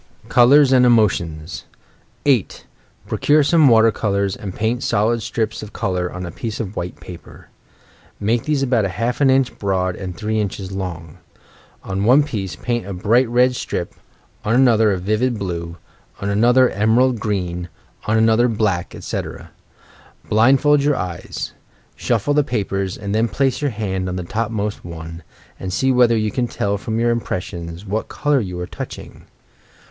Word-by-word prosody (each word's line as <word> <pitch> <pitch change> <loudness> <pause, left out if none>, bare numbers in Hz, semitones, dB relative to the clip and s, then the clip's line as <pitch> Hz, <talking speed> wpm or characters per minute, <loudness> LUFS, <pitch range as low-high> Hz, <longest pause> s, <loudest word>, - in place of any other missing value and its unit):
COLOURS 135 +3 +6
AND 130 -1 +5
EMOTIONS 85 -9 +1 0.6
8. 130 -8 +1 0.4
Procure 150 +1 +2
some 155 +1 +4
water 115 -2 +6
colours 100 -2 -1
and 95 -3 -7
paint 115 +3 -1
solid 115 +3 +1
strips 110 0 -2
of 105 -1 -9
colour 90 -1 -2
on 90 0 -6
a 85 - -6
piece 110 +5 -5
of 110 -5 -3
wliite 90 -3 -6
paper. 90 -2 -12 0.7
Make 115 +3 0
these 150 -3 +1
about 125 -4 +2
half 115 +8 -2
an 135 - +5
inch 130 -1 +2
broad 95 -2 0
and 90 -3 -7
three 110 0 -1
inches 100 -2 -4
long. 85 -5 -6 0.6
On 95 0 -3
one 130 +7 +5
piece 100 - -4
paint 120 0 -3
a 100 - -4
bright 115 +6 +2
red 125 +1 +3
strip, 90 -7 -4 0.5
on 110 +2 +1
another 115 -4 +4
a 95 - 0
vivid 110 +6 0
blue, 85 -4 -5 0.4
on 100 +1 -2
another 120 +5 +4
emerald 115 +4 +2
green, 90 -4 -3 0.4
on 110 +1 +2
another 110 +2 +4
black, 105 -6 -1
etc. - - -6 0.8
Blind 120 +5 +4
fold 145 -1 +4
your 145 0 +2
eyes, 90 -4 -5 0.4
shufBe 120 +4 0
the 150 0 +3
papers, 100 -6 -2
and 100 0 -4
then 110 +2 +2
place 135 +2 0
your 145 - +1
hand 95 -5 -3
on 90 - -3
the 90 - -3
topmost 105 +1 -3
one, 85 0 -8 0.4
and 95 - -5
see 130 +8 +1
whether 120 -2 +4
you 110 -1 0
can 120 +2 -1
tell 100 -3 -2
from 110 +2 -3
your 120 0 +2
impressions 90 -5 -4
what 105 +3 -2
colour 145 -2 +1
you 90 -6 -4
are 90 - -3
touching. - - -9
110 Hz, 165 wpm, -20 LUFS, 95-120 Hz, 0.8 s, COLOURS